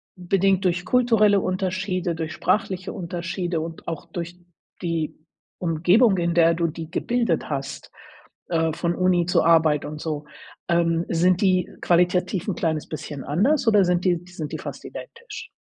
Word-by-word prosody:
bedingt 190 Hz, +1 st, +1 dB
durch 180 Hz, 0 st, +1 dB
kulturelle 225 Hz, -5 st, +4 dB
Unterschiede, 185 Hz, -1 st, -1 dB
durch 160 Hz, -1 st, -4 dB
sprachliche 190 Hz, -1 st, -1 dB
Unterschiede 170 Hz, -1 st, -3 dB
und 165 Hz, 0 st, -8 dB
auch 165 Hz, -3 st, -5 dB
durch 175 Hz, 0 st, -6 dB, 0.4 s
die 165 Hz, -3 st, -2 dB, 0.4 s
Umgebung, 180 Hz, +6 st, +3 dB
in 170 Hz, -1 st, 0 dB
der 165 Hz, -1 st, +4 dB
du 170 Hz, 0 st, 0 dB
die 160 Hz, 0 st, -7 dB
gebildet 230 Hz, -5 st, -1 dB
hast, 140 Hz, -1 st, -5 dB, 0.6 s
äh, 165 Hz, -2 st, +1 dB
von 170 Hz, +1 st, -1 dB
Uni 180 Hz, -1 st, +2 dB
zu -, -, +3 dB
Arbeit 160 Hz, -3 st, +4 dB
und 150 Hz, 0 st, -7 dB
so. 150 Hz, -2 st, -4 dB, 0.4 s
Ähm, 170 Hz, -1 st, +2 dB
sind 180 Hz, +2 st, +2 dB
die 185 Hz, -2 st, +2 dB
qualitativ 180 Hz, +2 st, +2 dB
'n 200 Hz, -, -1 dB
kleines 160 Hz, -2 st, -1 dB
bisschen 145 Hz, -3 st, -6 dB
anders, 250 Hz, -, +1 dB
oder 210 Hz, -3 st, +5 dB
sind 180 Hz, 0 st, +1 dB
die 175 Hz, -2 st, +2 dB
sind 170 Hz, -5 st, -7 dB
die -, -, -3 dB
fast -, -, -7 dB
identisch? 470 Hz, +1 st, -9 dB
175 Hz, 155 wpm, -23 LUFS, 165-185 Hz, 0.6 s, oder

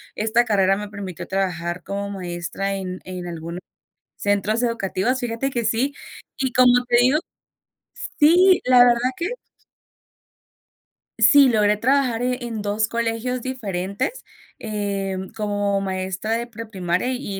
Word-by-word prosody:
Esta 225 Hz, +3 st, +2 dB
carrera 195 Hz, -3 st, +2 dB
me 210 Hz, 0 st, -5 dB
permitió 195 Hz, -4 st, -7 dB
trabajar 180 Hz, -2 st, -2 dB
como 200 Hz, 0 st, -4 dB
maestra 185 Hz, +1 st, -4 dB
en 185 Hz, -1 st, -5 dB
en 180 Hz, -1 st, -6 dB
algunos 170 Hz, 0 st, -6 dB, 0.6 s
centros 205 Hz, +3 st, 0 dB
educativos. 230 Hz, +1 st, 0 dB
Fíjate 245 Hz, +2 st, -2 dB
que 240 Hz, -3 st, -2 dB
sí. 240 Hz, +6 st, 0 dB, 0.4 s
Y, 265 Hz, -1 st, -1 dB
como 250 Hz, 0 st, +5 dB
te 240 Hz, 0 st, +3 dB
digo 260 Hz, +5 st, +4 dB, 1.0 s
sí, 355 Hz, +5 st, +6 dB
la 250 Hz, 0 st, +6 dB
verdad 245 Hz, +1 st, +2 dB
que. 340 Hz, -, -2 dB, 1.9 s
Sí 285 Hz, -2 st, +7 dB
logré 210 Hz, -2 st, +3 dB
trabajar 250 Hz, 0 st, +1 dB
e 250 Hz, 0 st, 0 dB
en 225 Hz, -3 st, -4 dB
2 210 Hz, +2 st, 0 dB
colegios 235 Hz, +2 st, -2 dB
diferentes, 215 Hz, -, -3 dB, 0.3 s
eh, 200 Hz, -3 st, -3 dB
mm, 190 Hz, 0 st, -7 dB
como 205 Hz, -1 st, -1 dB
maestra 190 Hz, +2 st, -3 dB
de 235 Hz, +1 st, -1 dB
preprimaria 215 Hz, -2 st, -3 dB
y 250 Hz, -4 st, -5 dB
215 Hz, 130 wpm, -22 LUFS, 195-245 Hz, 1.9 s, Sí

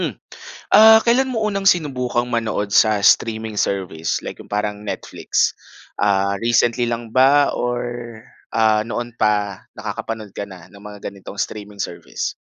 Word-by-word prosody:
Hmm, -, -, -3 dB, 0.6 s
ah, 220 Hz, +1 st, +9 dB
kailan 255 Hz, +3 st, +3 dB
mo 225 Hz, -4 st, -1 dB
unang 195 Hz, -2 st, +2 dB
sinubukang 125 Hz, -7 st, 0 dB
manood 110 Hz, -4 st, -2 dB
sa 110 Hz, 0 st, +5 dB
streaming 110 Hz, -1 st, +2 dB
service 95 Hz, -5 st, -1 dB
like -, -, -7 dB
yung -, -, -16 dB
parang 105 Hz, 0 st, -2 dB
Netflix, 105 Hz, -, -1 dB, 0.5 s
ah, 100 Hz, -1 st, +2 dB
recently 120 Hz, +1 st, +2 dB
lang 115 Hz, -1 st, -5 dB
ba 140 Hz, +2 st, +4 dB
or, 120 Hz, 0 st, -2 dB, 0.6 s
ah, 110 Hz, -1 st, +3 dB
noon 120 Hz, +1 st, -5 dB
pa 105 Hz, -3 st, 0 dB, 0.2 s
nakakapanood 110 Hz, -3 st, -6 dB
ka 100 Hz, -, -6 dB
na 90 Hz, -3 st, -12 dB
ng 100 Hz, -, -14 dB
mga 105 Hz, -1 st, -11 dB
ganitong 100 Hz, 0 st, -8 dB
streaming 105 Hz, 0 st, -5 dB
service? 85 Hz, -3 st, -4 dB
110 Hz, 145 wpm, -20 LUFS, 100-120 Hz, 0.6 s, ah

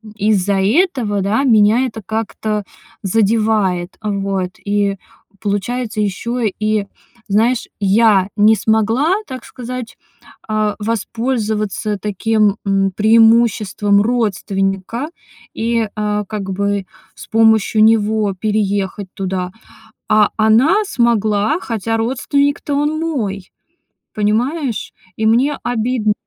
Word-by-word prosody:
из-за 200 Hz, -2 st, +1 dB
этого, 230 Hz, -, +1 dB
да, 215 Hz, +8 st, +1 dB
меня 225 Hz, +1 st, +4 dB
это 220 Hz, -2 st, -8 dB
как-то 220 Hz, -1 st, -3 dB, 0.4 s
задевает, 205 Hz, -3 st, +1 dB
э, 210 Hz, -, -2 dB
вот. 195 Hz, -2 st, -2 dB
И 200 Hz, -1 st, 0 dB, 0.4 s
получается 215 Hz, +2 st, -2 dB
ещё 235 Hz, +5 st, -2 dB
и, 215 Hz, -1 st, 0 dB, 0.4 s
знаешь, 230 Hz, +5 st, +1 dB
я 200 Hz, -1 st, +3 dB
не 215 Hz, +2 st, +5 dB
смогла, 225 Hz, -, +1 dB
так 255 Hz, -3 st, -8 dB
сказать, 250 Hz, -1 st, -7 dB, 0.5 s
а, 215 Hz, -1 st, 0 dB
воспользоваться 215 Hz, -2 st, -2 dB
таким, 210 Hz, 0 st, +1 dB
м, 195 Hz, 0 st, +1 dB
преимуществом 220 Hz, -2 st, +3 dB
родственника 205 Hz, -, -1 dB, 0.4 s
и, 230 Hz, -1 st, 0 dB
а, 210 Hz, -1 st, -1 dB
как 195 Hz, -2 st, -5 dB
бы 200 Hz, 0 st, -1 dB, 0.3 s
с -, -, -11 dB
помощью 220 Hz, -1 st, +3 dB
него 215 Hz, -2 st, +2 dB
переехать 205 Hz, -2 st, -1 dB
туда. 185 Hz, -2 st, -3 dB, 0.6 s
А 215 Hz, -1 st, +4 dB
она 235 Hz, -, +4 dB
смогла, 220 Hz, -, +1 dB
хотя 225 Hz, -, -2 dB
родственник-то 280 Hz, +4 st, 0 dB
он 295 Hz, +2 st, 0 dB
мой, 210 Hz, -, -3 dB, 0.6 s
понимаешь? 235 Hz, +5 st, -1 dB, 0.2 s
И 220 Hz, -, -1 dB
мне 265 Hz, +6 st, +2 dB
обидн 230 Hz, -2 st, 0 dB
215 Hz, 105 wpm, -17 LUFS, 200-230 Hz, 0.6 s, не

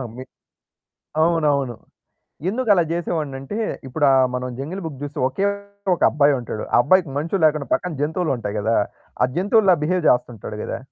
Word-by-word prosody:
మీ 130 Hz, -, -7 dB, 1.0 s
అవునవును. 145 Hz, -7 st, +1 dB, 0.7 s
ఎందుకలా 210 Hz, -5 st, +3 dB
జేసేవాన్నంటే 155 Hz, -1 st, -3 dB, 0.3 s
ఇప్పుడు 145 Hz, +4 st, 0 dB
ఆ! 135 Hz, -, +5 dB, 0.2 s
మనం 125 Hz, 0 st, -3 dB
జంగిల్ 175 Hz, +8 st, -5 dB
బుక్ 145 Hz, -5 st, -6 dB
జుస్తే 145 Hz, 0 st, -5 dB
ఒకే 195 Hz, +10 st, -1 dB, 0.5 s
ఒకబ్బాయుంటాడు. 140 Hz, -8 st, +2 dB
ఆ! -, -, +6 dB
అబ్బాయికి 175 Hz, +2 st, +3 dB
మనుషులు 165 Hz, +5 st, -1 dB
లేకుండా 150 Hz, -4 st, +1 dB
పక్కన 180 Hz, -2 st, -1 dB
జంతువులుంటాయి 145 Hz, -, -1 dB
కదా! 110 Hz, +2 st, +1 dB, 0.5 s
ఆ! -, -, +6 dB
జంతువుల్లా 195 Hz, 0 st, +4 dB
బిహేవ్ 180 Hz, +2 st, 0 dB
జేస్తుంటాడు 120 Hz, -4 st, 0 dB
గదా! -, -, -4 dB
150 Hz, 130 wpm, -22 LUFS, 130-180 Hz, 1.0 s, ఆ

